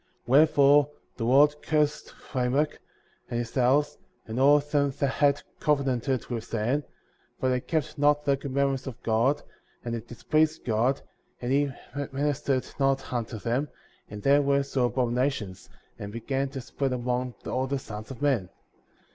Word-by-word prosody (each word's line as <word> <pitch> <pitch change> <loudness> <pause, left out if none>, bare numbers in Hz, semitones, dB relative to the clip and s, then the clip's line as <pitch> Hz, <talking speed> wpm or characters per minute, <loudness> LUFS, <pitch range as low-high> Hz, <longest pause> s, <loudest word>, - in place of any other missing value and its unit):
52. - - -6
Wherefore 145 0 +6 0.3
the 115 - -2
Lord 145 +4 +5
cursed 150 -1 0 0.2
Lamech, 130 +4 0 0.5
and 120 - -2
his 120 -1 -3
house, 135 +3 +2 0.3
and 115 +2 -4
all 145 +2 +7
them 145 -1 +1
that 140 - +1
had 140 +1 +2 0.2
covenanted 135 -4 0
with 115 -3 -4
Satan 120 +6 -1
;^ - - -23 0.5
for 130 - +1
they 125 0 +1
kept 155 +2 -3
not 145 0 +3
the 140 -1 +3
commandments 135 -1 -1
of 130 - -7
God, 115 +6 +2 0.4
and 120 - -2
it 115 0 -5
displeased 155 +7 0
God, 120 +4 +1 0.4
and 120 +1 -3
he 140 0 +2 0.4
ministered 140 -1 0
not 135 -1 +1
unto 115 -2 -3
them, 125 +7 -1 0.4
and 105 0 -8
their 140 +1 +5
works 140 0 0
were 130 -2 +3
abominations, 120 -5 -1 0.3
and 100 0 -6
began 135 +5 -2
to 135 -1 -6
spread 135 +1 -2
among 125 0 -2
all 130 +1 -1
the 140 +1 -1
sons 110 -4 -8
of 135 +1 -8
men. 120 -11 +1
135 Hz, 160 wpm, -27 LUFS, 120-145 Hz, 0.5 s, all